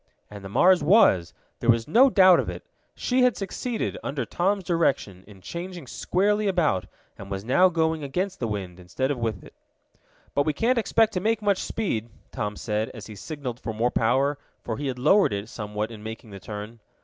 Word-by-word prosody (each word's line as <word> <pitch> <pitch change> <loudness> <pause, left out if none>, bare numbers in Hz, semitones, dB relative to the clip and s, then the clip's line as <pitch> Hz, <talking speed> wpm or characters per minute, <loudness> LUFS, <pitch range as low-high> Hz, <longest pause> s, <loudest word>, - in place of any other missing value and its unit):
And 100 -1 -9
the 95 - -7
Mars 180 - +4
was. 145 - +4 0.3
There 120 - -2
was 115 -1 +3
no 250 - +6
doubt 185 -6 +6
of - - -2
it. - - -7 0.3
She 255 +1 0
had 250 -3 +3
succeeded, 225 +4 -3
under 140 -1 -3
Tom's 195 +2 0
direction, 140 - 0
in 100 -3 -15
changing 175 - -7
squarely 205 - 0
about, 165 - +1 0.3
and 100 - -9
was 95 +1 -5
now 180 +10 +5
going 160 -2 0
against 180 +8 -3
the 120 - -1
wind, 95 -4 -5
instead 110 +10 -2
of 135 - -3
with 110 -5 -3
it. - - -14 0.8
"But 140 +1 +1
we 155 - +2
can't 235 - +1
expect 225 0 +2
to 180 - 0
make 220 +2 0
much 200 -2 +2
speed," 120 - -2 0.2
Tom 105 0 -3
said, 105 +1 -2
as 110 - -9
he 110 - -10
signaled 130 +1 -6
for 110 -1 -5
more 120 +3 +1
power, 135 +5 +1 0.2
for 115 - -4
he 145 - -3
had 130 -2 -3
lowered 150 - +4
it 100 +2 -4
somewhat 105 0 -4
in 110 -2 -10
making 110 0 -8
the 100 - -9
turn. 105 +4 -8
135 Hz, 200 wpm, -25 LUFS, -, 0.8 s, no